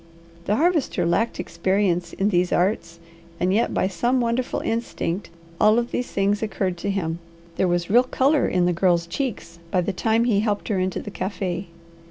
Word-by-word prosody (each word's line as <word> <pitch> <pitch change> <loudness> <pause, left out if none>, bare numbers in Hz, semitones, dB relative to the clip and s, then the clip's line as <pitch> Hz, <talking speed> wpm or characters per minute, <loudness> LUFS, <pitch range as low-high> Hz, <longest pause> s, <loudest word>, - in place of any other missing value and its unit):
The 210 - +1
Harvester 305 - +1
lacked 200 +7 0
experience 185 -3 0
in 195 +2 +1
these 180 -2 +1
arts, 170 -3 0 0.4
and 185 +1 +1
yet 230 +4 +2
by - - +1
some 240 +8 0
wonderful 240 +1 0
instinct 220 -5 -2 0.3
all 215 +1 +5
of 240 0 -1
these 245 - -3
things 200 +1 +1
occurred 195 -4 -1
to 200 - -2
him. 170 -4 -2 0.4
There 190 - +2
was 175 -1 0
real 240 +3 +7
colour 275 +3 +2
in 180 -1 +2
the 175 - +2
Girl's 170 -1 +2
cheeks 170 -4 -4
by 180 +1 +2
the 195 +3 -2
time 225 +4 +2
he 230 -4 +2
helped 210 0 -1
her 200 -3 +1
into 185 0 -1
the 205 - -7
cafe'. 185 -1 -3
195 Hz, 185 wpm, -23 LUFS, 175-225 Hz, 0.4 s, real